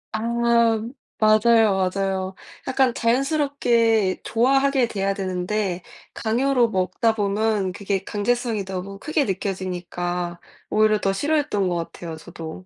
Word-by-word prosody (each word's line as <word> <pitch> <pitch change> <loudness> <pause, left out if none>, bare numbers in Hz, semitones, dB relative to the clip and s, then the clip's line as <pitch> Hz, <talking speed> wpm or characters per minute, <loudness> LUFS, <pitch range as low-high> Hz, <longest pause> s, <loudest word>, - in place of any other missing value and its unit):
아 215 - -2 1.0
맞아요, 215 -3 +4
맞아요. 190 -1 -2 0.3
약간 260 -2 +2
자연스럽게 235 - +1
좋아하게 270 +2 +2
돼야 195 -3 -1
되는데 185 0 -2 0.3
강요로 240 +2 +1
먹다 220 +3 0
보면 205 -1 0
그게 200 0 -3
강제성이 225 +1 -1
너무 190 +1 -6
크게 305 +5 0
느껴지니까 180 -2 -3 0.3
오히려 215 0 +3
더 195 - +1
싫어했던 290 -5 0
것 175 - -1 0.2
같아요, 165 -2 -7
저도. 165 +2 -9
205 Hz, 280 characters per minute, -23 LUFS, 190-235 Hz, 1.0 s, 맞아요